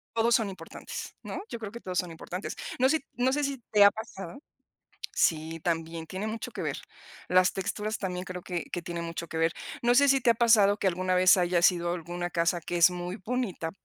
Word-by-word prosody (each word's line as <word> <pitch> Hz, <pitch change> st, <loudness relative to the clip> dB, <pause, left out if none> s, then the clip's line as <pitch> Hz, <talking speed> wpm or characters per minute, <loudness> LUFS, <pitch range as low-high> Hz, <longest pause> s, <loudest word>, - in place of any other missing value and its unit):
Todos 230 Hz, +1 st, +4 dB
son 220 Hz, -4 st, +1 dB
importantes, 190 Hz, -, -8 dB
¿no?, -, -, -5 dB
yo -, -, -5 dB
creo 215 Hz, -3 st, -6 dB
que 235 Hz, -, -8 dB
todos 185 Hz, -5 st, -5 dB
son 180 Hz, -2 st, -3 dB
importantes, 175 Hz, +4 st, -6 dB, 0.2 s
no 260 Hz, +1 st, +5 dB
sé 315 Hz, -, +2 dB
no 255 Hz, +1 st, +1 dB
sé 295 Hz, +1 st, 0 dB
si 275 Hz, -2 st, -2 dB
te 210 Hz, -1 st, +6 dB
ha 200 Hz, -, +8 dB
pasado 220 Hz, +1 st, -8 dB, 0.8 s
Sí, 160 Hz, 0 st, +1 dB
también 165 Hz, 0 st, -2 dB
tiene 190 Hz, +5 st, -4 dB
mucho 220 Hz, +1 st, -4 dB
que -, -, -6 dB
ver -, -, -2 dB, 0.5 s
las 185 Hz, 0 st, +4 dB
texturas 210 Hz, +3 st, -2 dB
también 180 Hz, -2 st, -3 dB
creo 180 Hz, -1 st, -6 dB
que 175 Hz, -2 st, -4 dB
que 175 Hz, -, -3 dB
tiene 170 Hz, 0 st, -5 dB
mucho 170 Hz, 0 st, -5 dB
que 160 Hz, -, -4 dB
ver. 165 Hz, 0 st, +2 dB, 0.3 s
No 240 Hz, 0 st, +3 dB
sé, 280 Hz, +3 st, +6 dB
si 270 Hz, 0 st, +4 dB
te 250 Hz, -, 0 dB
ha 235 Hz, -, +6 dB
pasado 220 Hz, -3 st, +5 dB
que 200 Hz, -, +1 dB
alguna 185 Hz, +1 st, 0 dB
vez 185 Hz, +1 st, +6 dB
hayas 175 Hz, 0 st, +4 dB
ido 175 Hz, 0 st, -2 dB
alguna 175 Hz, +1 st, -4 dB
casa 170 Hz, 0 st, 0 dB
que 175 Hz, +2 st, -4 dB
es 170 Hz, +1 st, +6 dB
muy 180 Hz, +1 st, -5 dB
bonita 225 Hz, -9 st, -2 dB
185 Hz, 220 wpm, -28 LUFS, 175-220 Hz, 0.8 s, ha